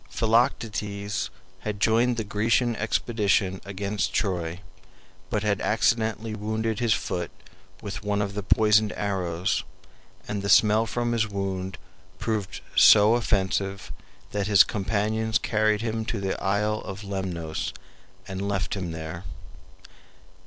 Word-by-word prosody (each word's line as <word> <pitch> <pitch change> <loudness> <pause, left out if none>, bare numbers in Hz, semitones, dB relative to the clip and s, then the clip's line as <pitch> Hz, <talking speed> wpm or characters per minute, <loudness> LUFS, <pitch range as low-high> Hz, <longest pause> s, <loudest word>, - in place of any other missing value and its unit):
Philoctetes 105 -3 0 0.3
had 105 -1 -4
joined 115 +3 +3
the 110 - -1
Grecian 115 +4 +1
expedition 105 -4 0
against 100 +1 -2
Troy, 90 -3 -1 0.7
but 105 -1 -1
had 105 -2 0
accidentally 110 0 +1
wounded 110 +1 -2
his 115 -3 +3
foot 85 -2 -3 0.5
with 100 -2 -5
one 105 0 0
of 100 -1 -1
the 105 - -3
poisoned 105 +2 +3
arrows, 90 -3 -1 0.6
and 100 -1 -3
the 100 - -3
smell 110 +2 +5
from 120 +2 -1
his 115 -1 +1
wound 95 -2 -3 0.4
proved 110 -4 -3
so 105 +2 +8
offensive 100 -4 0 0.4
that 100 -1 -1
his 100 -3 +7
companions 110 +2 0
carried 110 -1 +1
him 110 -1 -2
to 115 -1 -2
the 95 -1 -1
isle 105 +2 +1
of 95 +2 -7
Lemnos 90 -5 -3 0.6
and 95 +1 -4
left 100 -1 -1
him 90 -4 -3
there. 80 +2 -6
105 Hz, 125 wpm, -26 LUFS, 95-110 Hz, 0.7 s, so